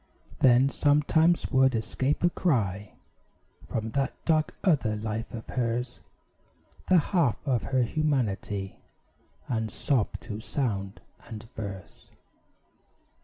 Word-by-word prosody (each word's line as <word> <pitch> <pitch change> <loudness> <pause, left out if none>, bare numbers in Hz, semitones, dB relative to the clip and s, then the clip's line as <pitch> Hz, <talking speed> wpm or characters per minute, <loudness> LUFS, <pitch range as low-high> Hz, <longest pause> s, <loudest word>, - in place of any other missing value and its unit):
Then 130 +1 +6
sometimes 150 +4 +2
would 130 -2 +4
escape 130 +7 -1
a 175 - +4
cry 105 - 0 0.8
From 110 0 -3
that 135 +1 -1
dark 155 -1 +2
other 140 - +2
life 110 +2 -4
of 115 -3 -7
hers 120 0 -1 0.9
The 185 - +6
half 165 - +2
of 125 -4 +1
her 130 -2 +2
humanity 115 -9 -1 0.7
And 110 -2 -1
sob 120 +1 0
through 105 -3 -6
sound 105 -6 -3 0.3
and 110 -2 -7
verse. 100 -4 -8
125 Hz, 110 wpm, -28 LUFS, 110-145 Hz, 0.9 s, Then